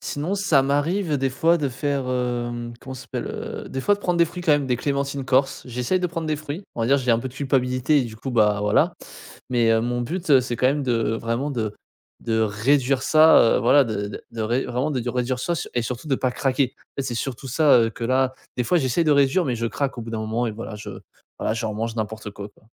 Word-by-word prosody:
Sinon, 150 +7 -3
ça 190 -9 +3
m'arrive 150 +5 0
des 135 0 +1
fois 165 +6 +2
de 145 -3 0
faire, 140 +1 -2
hem, 120 -1 -2
comment 130 - -8
ça 130 - -9
s'appelle? - - -5
Heu, - - -6
des 130 - -4
fois, 205 - +4
de 205 - -12
prendre 180 -3 0
des 170 - +6
fruits, 175 +2 -7
quand 165 -3 +4
même, 145 -2 +2
des 125 -1 +1
clémentines 140 0 -2
corses. 135 +1 +1
J'essaye 125 +9 -1
de 180 - +1
prendre 165 -1 -4
des 155 -1 0
fruits, 155 +4 -6
on - - -4
va 115 - +1
dire, 135 +3 +4
j'ai 125 -2 0
un 115 - +4
peu 130 - -4
de 125 - -15
culpabilité, 130 +1 +1
et - - +2
du 115 -3 -7
coup, 130 +4 -5
bah, 105 -4 +3
voilà. 105 0 +2 0.6
Mais, 120 -2 +3
heu, 115 0 +4
mon 120 +1 -1
but, 170 +8 -4
heu, 135 -2 +7
c'est 125 -1 -4
quand 125 - +2
même 145 +2 +1
de 115 -4 0
vraiment 115 +5 -2
de 110 -6 -3 0.5
de 110 -1 0
réduire 130 +5 +1
ça, 155 +1 +7 0.2
heu, - - +2
voilà, 140 +4 +5
de 105 -3 -3
de 100 - -7
de 115 - -5
ré 120 +4 0
de - - -6
vraiment 125 +5 -1
de 125 -4 -2
réduire 125 +1 -1
ça 170 +7 -1 0.2
et 120 - +1
surtout 125 +5 -5
de 135 - +2
pas 130 -1 -1
craquer. 130 0 0
En - - -40 0.2
fait, 140 - -1
c'est 120 - -3
surtout 130 +2 -4
ça, 145 0 +5
heu, 115 -1 +2
que 120 - -11
là, 130 +2 +1 0.2
des 125 - 0
fois 175 - +2
j'essaye 155 +2 +1
de 155 - +4
réduire. 140 +5 +3
Mais, 125 - -1
je 115 0 -2
craque 135 +1 -2
au - - -4
bout 115 - -8
d'un 115 - -3
moment 110 +2 -1
et - - -1
voilà, 110 0 -7
je 105 - -8 0.5
voilà, 110 - -1
je 115 0 -3
remange 110 +1 -3
n'importe 110 -1 -4
quoi, 100 +1 -8
quoi. 105 - -27
130 Hz, 265 wpm, -23 LUFS, 115-145 Hz, 0.6 s, heu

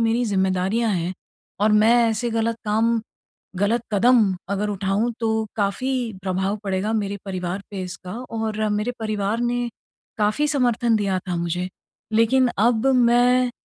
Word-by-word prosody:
मेरी 230 +2 +2
ज़िम्मेदारियाँ 195 +2 +1
हैं 175 +1 -2 0.5
और 210 +1 +4
मैं 215 +2 +5
ऐसे 225 +2 -1
गलत 230 0 0
काम 225 +2 +2 0.6
गलत 215 +5 +1
कदम 215 -1 +4 0.2
अगर 200 +1 -1
उठाऊँ 200 +3 0
तो, 220 -1 0
काफ़ी 235 +3 -1
प्रभाव 190 +2 -1
पड़ेगा 195 +2 -1
मेरे 200 -2 -1
परिवार 185 0 -3
पे 195 -2 -4
इसका 180 0 -7 0.2
और 220 -1 -2
मेरे 210 +3 -1
परिवार 215 0 -1
ने 240 0 -1 0.5
काफ़ी 215 +8 +1
समर्थन 240 -5 +2
दिया 200 -3 0
था 180 - -1
मुझे। 170 +1 -2 0.5
लेकिन 250 +4 +4
अब 225 +3 +2
मैं 245 +1 +4
215 Hz, 140 wpm, -22 LUFS, 195-235 Hz, 0.6 s, मैं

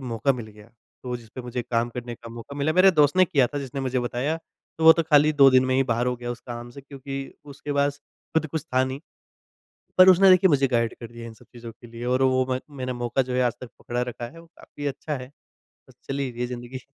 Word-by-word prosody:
मौका 120 +2 0
मिल 120 -3 -7
गया, 105 0 -16 0.4
तो 125 -1 -3
जिसपे 115 +1 -10
मुझे 125 0 -4
काम 120 0 -1
करने 120 0 -6
का 115 0 -12
मौका 120 +5 -9
मिला। 145 +2 0
मेरे 185 +3 +6
दोस्त 150 -1 +3
ने 185 - +7
किया 140 -7 +2
था 145 - -5
जिसने 135 0 -5
मुझे 130 -1 -1
बताया 125 +6 -2 0.4
तो 160 - -1
वो 160 - +11
तो 165 - +1
खाली 150 -1 +4
2 140 -2 +7
दिन 130 0 +5
में 130 - +1
ही 135 - +4
बाहर 120 +1 0
हो 125 0 0
गया 120 0 -6
उस 120 - -11
काम 120 0 -6
से 140 - -11
क्योंकि 135 0 -8 0.4
उसके 145 +1 -6
पास 140 0 +1 0.4
खुद 160 -1 +2
कुछ 155 -1 -4
था 130 0 +4
नहीं 130 0 -4
है 160 - -32 0.8
पर 185 0 +9
उसने 190 +1 +7
देखिए 185 +1 +6
मुझे 140 -2 +3
गाइड 115 -2 0
कर 115 - -7
दिया 120 - -11
है 115 - -7
इन 110 - -12
सब - - -20
चीज़ों 120 -1 -9
के 120 - -16
लिए 115 +1 -8
और 125 +1 +1
वो 130 0 +3
म 130 - 0 0.2
मैंने 130 0 -3
मौका 120 +2 -1
जो 125 - -2
है 125 - +1
आज 120 -1 +1
तक 125 - -8
पकड़ा 120 0 -3
रखा 125 -1 -5
है, 165 +7 -12
वो 170 - -15
काफ़ी 145 - -10
अच्छा 145 +2 -4
है। 125 +1 -10 0.8
चलिए 135 -1 -2
ये 125 - -1
ज़िंदगी 125 +1 -7
130 Hz, 260 wpm, -24 LUFS, 120-145 Hz, 0.8 s, वो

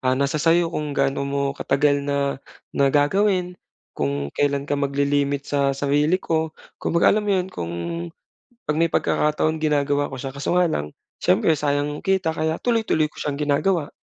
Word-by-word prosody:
Ah, 130 0 +1
nasa 140 +2 0
sa'yo 165 +1 +3
kung 150 -3 -3
gaano 140 0 0
mo 140 0 -1
katagal 140 +1 +1
na 140 -1 -1 0.3
na 140 0 +3
gagawin, 180 +6 +2 0.4
kung 70 0 -2
kailan 140 -1 0
ka 145 0 -2
magli-limit 140 0 0
sa 140 -1 0
sarili 145 +5 +2
ko, 160 -3 -2 0.2
kumbaga 170 - +3
alam 215 0 0
mo - - +3
'yon 185 0 -1
kung 85 -1 -5 0.9
'pag 150 0 -1
may 165 - +3
pagkakataon 155 0 +1
ginagawa 145 -2 +1
ko 135 - -7
siya 135 +1 -6
kaso 140 +5 -1
nga 180 - +4
lang, 75 - -2 0.3
siyempre 160 - +3
sayang 145 -1 0
yung 150 - -7
kita 190 -4 +1
kaya 160 0 -1
tuloy-tuloy 225 -10 +1
ko - - -20
siyang 145 -1 -2
ginagawa. 150 +3 0
145 Hz, 170 wpm, -22 LUFS, 140-160 Hz, 0.9 s, nga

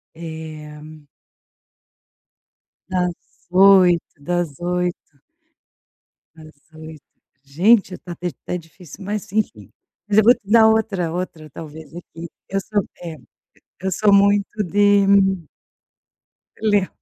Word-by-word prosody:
eh 160 -2 -9 2.1
Das 180 -1 0 0.4
8, 185 -2 +6 0.2
das 170 -1 -3
8. 175 -4 -3 1.2
Das 155 -1 -15 0.2
8, 155 -1 -11 0.4
gente, 185 +7 +3
tá 175 -1 -9 0.3
tá - - -3
difícil 175 +2 -12
mas 205 0 -4
enfim, 160 - -2 0.4
mas 205 0 +2
eu 215 - +6
vou 240 +3 +7
te 200 - -23
dar 220 0 +7
outra 200 -6 0
outra 170 -3 -5
talvez 160 +2 -11
aqui, 170 -1 -10 0.2
eu 195 +1 -1
sou 205 +1 -1 0.2
eh, 165 -2 -7 0.6
eu 190 +1 -2
sou 205 +3 +2
muito 200 +1 +3
de 205 +1 +3 1.5
le 205 -3 +2
180 Hz, 105 wpm, -20 LUFS, 160-200 Hz, 2.1 s, vou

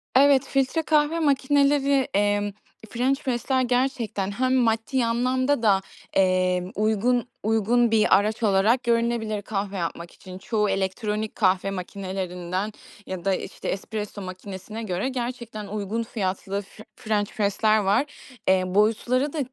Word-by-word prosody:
Evet, 275 0 +6
filtre 275 +4 +1
kahve 305 +1 +2
makineleri, 280 -2 +3
emm, 205 0 +1 0.4
Ffrench 265 +4 0
press'ler 260 0 0
gerçekten 245 -5 0
hem 255 +5 +1
maddi 235 +1 +1
anlamda 255 +3 +1
da, 195 -3 +4 0.3
emm, 185 -1 +2
uygun 220 +4 +1 0.2
uygun 225 +2 +2
bir 220 -1 +5
araç 215 +3 -1
olarak 215 +5 +3
görünebilir 230 -3 0
kahve 200 -1 -3
yapmak 170 0 -4
için. 185 -1 -11
Çoğu 210 +1 0
elektronik 210 +3 -2
kahve 190 -1 +2
makinelerinden 185 0 -4 0.3
ya 185 -1 -6
da, 195 - +3
işte, 185 - -6
espresso 205 +1 -4
makinesine 190 +4 -7
göre 190 +4 -2
gerçekten 235 -4 -5
uygun 210 +2 -3
fiyatlı 195 -2 -3
f 205 +2 -14
french 210 -1 -1
press'ler 215 +1 +2
var. 205 +6 +2 0.4
Eee, 190 -1 +4
boyutları 225 +8 +1
da, 315 - -3
215 Hz, 130 wpm, -25 LUFS, 195-250 Hz, 0.4 s, Evet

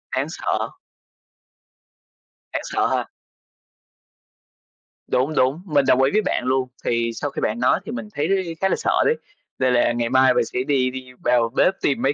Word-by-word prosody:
Đáng 135 +2 0
sợ. - - -2 1.8
Đáng - - -1
sợ - - 0
ha. - - 0 2.0
Đúng, 135 +5 0
đúng, 135 +6 +2
mình 145 -6 +2
đồng 130 - +4
ý 135 - +3
với 215 - +3
bạn 190 - -1
luôn. 130 0 +1 0.2
Thì 115 0 0
sau 145 +5 -3
khi - - -6
bạn 110 +2 -1
nói 125 - +3
thì - - -6
mình 115 -3 -5
thấy 170 +3 -1
khá 190 - +3
là - - +2
sợ - - +1
đấy, 460 - +3 0.4
nên 130 -1 +2
là 120 - +3
ngày 120 0 -1
mai 130 0 +5
mình 120 -1 +2
sẽ 125 - -4
đi 135 -3 +2
đi 130 0 -8
vào 120 -2 +3
bếp 185 - +4
tìm 140 - +1
mấy 135 - +2
130 Hz, 185 wpm, -22 LUFS, 125-145 Hz, 2.0 s, mai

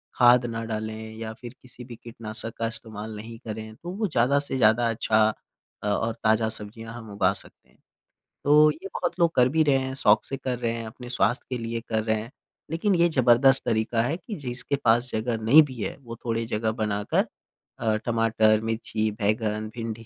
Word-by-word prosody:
खाद 120 0 +6
न 115 -1 -4
डालें 110 0 -5
या 110 -1 -5
फ़िर 120 +2 -11
किसी 125 0 -12
भी 120 -1 -9
कीटनाशक 115 -1 -7
का 115 - -1
इस्तेमाल 110 -1 -4
नहीं 115 +2 -8
करें 110 0 -6
तो 170 - -9
वो 215 +1 0
ज़्यादा 140 -2 +2
से 140 -2 -3
ज़्यादा 115 0 +4
अच्छा 110 -1 +2 0.6
अ, 105 - -2
और 110 +3 0
ताज़ा 110 +1 +3
सब्ज़ियाँ 115 +1 -7
हम 115 -2 -9
उगा 95 -2 +3
सकते - - -11
हैं। - - -28 0.7
तो 150 +1 +6
ये 185 +6 -8
बहुत 175 0 -3
लोग 170 -1 +4
कर 125 0 +5
भी 160 +2 +3
रहे 140 -3 +3
हैं, 130 0 -3
शौक़ 105 -5 +4
से 135 - -4
कर 130 -2 -3
रहे 120 -2 0
हैं 115 -1 -5
अपने 120 +2 -10
स्वास्थ्य 120 -1 +1
के 125 - -2
लिए 115 0 -3
कर 110 -1 0
रहे 110 0 +1
हैं। 115 +3 -10 0.4
लेकिन 185 +4 +1
ये 170 0 +4
ज़बरदस्त 130 -1 +4
तरीका 115 0 +1
है 125 +7 0
कि 210 +3 -7
जिसके 130 +1 -2
पास 120 +2 +4
जगह 115 +1 -1
नहीं 145 +8 +8
भी 135 -3 -8
है 95 - -3
वो 115 -3 -8
थोड़ी 115 -1 -1
जगह 110 -1 -1
बनाकर 105 -1 0 0.5
अ, 110 -2 +1
टमाटर, 110 -2 +3
मिर्ची, 110 -1 -2
बैंगन, 110 0 -1
भिंडी 115 -1 -5
115 Hz, 200 wpm, -25 LUFS, 110-125 Hz, 0.7 s, नहीं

